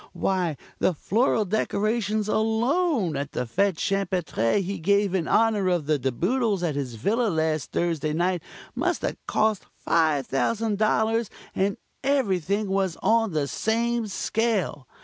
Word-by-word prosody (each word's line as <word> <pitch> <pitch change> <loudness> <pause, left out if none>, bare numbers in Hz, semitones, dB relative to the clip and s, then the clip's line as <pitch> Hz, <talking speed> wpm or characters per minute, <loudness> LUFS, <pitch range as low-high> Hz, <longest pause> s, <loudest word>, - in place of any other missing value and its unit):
Why, 180 -6 0 0.2
the 185 - +2
floral 220 - +1
decorations 215 +1 0
alone 225 - +1
at 140 0 -4
the 125 - -2
Fête 195 - +1
Champêtre 180 - 0
he 195 0 -3
gave 200 +3 +2
in 180 -4 0
honor 215 -3 +3
of 175 -4 +1
the 150 -1 +1
De 130 0 0
Boodles 205 - 0
at 165 -3 0
his 135 -4 -4
villa 225 - +1
last 160 -3 -1
Thursday 165 -3 0
night 175 +2 0 0.3
must 345 +8 -1
have - - -2
cost 215 -2 +1 0.2
$5,000, 210 - +1 0.2
and 195 +1 0 0.3
everything 205 - +1
was 190 -3 0
on 225 -4 +3
the 150 -2 0
same 230 +5 0
scale. 205 - -1
195 Hz, 135 wpm, -25 LUFS, 160-220 Hz, 0.3 s, honor